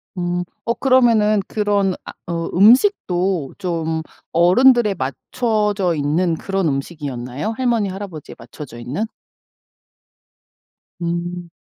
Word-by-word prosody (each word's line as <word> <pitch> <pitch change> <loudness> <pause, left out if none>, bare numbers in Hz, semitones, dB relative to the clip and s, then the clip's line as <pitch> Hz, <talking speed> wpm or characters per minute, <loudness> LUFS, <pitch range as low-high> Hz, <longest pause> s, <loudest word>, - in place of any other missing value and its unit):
음 175 0 -1 0.2
어 235 - +1
그러면은 230 -6 +3
그런 205 -3 +1
아 - - -8 0.2
어 165 -1 -2
음식도 195 - +3
좀 165 -3 -2 0.3
어른들에 210 +5 +5
맞춰져 205 - -1
있는 160 +4 +1
그런 195 0 -1
음식이였나요? 135 - -4
할머니, 235 -5 +1
할아버지에 185 -5 -7
맞춰져 120 +1 -10
있는? 140 - -3 2.0
음. 175 0 -3
180 Hz, 230 characters per minute, -20 LUFS, 160-210 Hz, 2.0 s, 어른들에